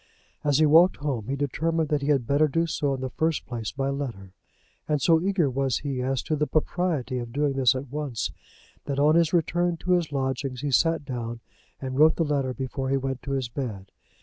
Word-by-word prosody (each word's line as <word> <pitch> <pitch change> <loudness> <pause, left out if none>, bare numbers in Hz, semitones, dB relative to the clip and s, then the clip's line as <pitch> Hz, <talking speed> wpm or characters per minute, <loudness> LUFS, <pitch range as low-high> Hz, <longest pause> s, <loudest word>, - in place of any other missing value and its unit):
As 145 -2 +3
he 155 - +5
walked 165 +5 +6
home 135 -7 -3
he 135 - -1
determined 155 +3 -1
that 150 -2 +1
he 140 - -3
had 140 -5 +2
better 145 +5 +3
do 165 +3 +1
so 145 -4 -1
in 130 - -7
the 130 -1 -3
first 160 +4 -1
place 115 -4 -4
by 135 0 -2
letter, 115 -10 -5 0.5
and 150 -1 +1
so 160 +3 +4
eager 190 -4 +1
was 135 -1 0
he 135 -3 -2
as 130 +1 -1
to 155 - -1
the 150 0 0
propriety 155 -5 -1
of 120 -1 -6
doing 145 +2 0
this 130 -2 +3
at 130 0 -5
once, 140 -7 -3 0.5
that 140 - -3
on 150 +2 +4
his 165 -1 +3
return 175 0 +1
to 180 - -3
his 175 -4 +2
lodgings 135 -2 -2
he 145 -1 -2
sat 165 +2 +2
down, 120 -3 -4 0.4
and 130 0 -4
wrote 155 +1 +6
the 165 - 0
letter 140 -3 0
before 130 +2 -4
he 135 - +2
went 135 -1 -3
to 140 - -4
his 135 -2 -1
bed. 115 -7 -6
140 Hz, 220 wpm, -26 LUFS, 130-155 Hz, 0.5 s, walked